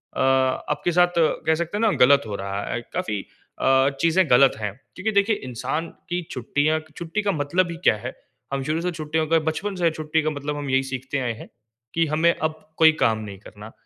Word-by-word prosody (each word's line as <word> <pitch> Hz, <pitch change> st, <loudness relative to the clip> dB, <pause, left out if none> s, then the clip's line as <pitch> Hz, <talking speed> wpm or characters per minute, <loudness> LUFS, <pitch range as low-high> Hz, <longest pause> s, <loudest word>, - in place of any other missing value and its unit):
अ, -, -, -4 dB
आपके 130 Hz, +5 st, +1 dB
साथ 175 Hz, +1 st, +5 dB
कह 160 Hz, 0 st, +2 dB
सकते 170 Hz, +4 st, -3 dB
हैं 215 Hz, -, -2 dB
ना 220 Hz, -2 st, +4 dB
ग़लत 140 Hz, +3 st, +6 dB
हो 105 Hz, -, -4 dB
रहा 100 Hz, +1 st, -4 dB
है। 120 Hz, -, -1 dB
काफ़ी 105 Hz, -3 st, -2 dB, 0.4 s
अ, 135 Hz, +1 st, +4 dB
चीज़ें 170 Hz, 0 st, +3 dB
ग़लत 130 Hz, +2 st, +6 dB
हैं 105 Hz, -2 st, -2 dB, 0.2 s
क्योंकि 215 Hz, +4 st, -1 dB
देखिए 200 Hz, +1 st, +3 dB
इंसान 130 Hz, +7 st, -3 dB, 0.2 s
की 175 Hz, +1 st, -1 dB
छुट्टियाँ 145 Hz, +5 st, 0 dB, 0.2 s
छुट्टी 170 Hz, +5 st, -3 dB
का 200 Hz, -1 st, +1 dB
मतलब 170 Hz, +3 st, 0 dB
ही 170 Hz, -, -6 dB
क्या -, -, +6 dB
है? 120 Hz, +4 st, -7 dB, 0.4 s
हम 135 Hz, -1 st, -1 dB
शुरू 155 Hz, +4 st, -1 dB
से 180 Hz, 0 st, -1 dB
छुट्टियों 155 Hz, -1 st, -2 dB
का 165 Hz, +1 st, +3 dB
बचपन 200 Hz, +5 st, -3 dB
से 175 Hz, -2 st, +2 dB
छुट्टी 155 Hz, 0 st, -1 dB
का 155 Hz, -, +1 dB
मतलब 145 Hz, 0 st, -4 dB
हम 145 Hz, -2 st, -4 dB
यही 135 Hz, 0 st, +2 dB
सीखते 130 Hz, +1 st, -4 dB
आए 120 Hz, -3 st, -1 dB
हैं 110 Hz, -, -11 dB, 0.4 s
कि 165 Hz, 0 st, +2 dB
हमें 160 Hz, +3 st, +3 dB
अब 155 Hz, 0 st, -2 dB, 0.2 s
कोई 160 Hz, -1 st, +7 dB
काम 110 Hz, -1 st, +3 dB
नहीं 100 Hz, -2 st, -8 dB
करना। 105 Hz, +2 st, -12 dB
155 Hz, 210 wpm, -23 LUFS, 130-170 Hz, 0.4 s, कोई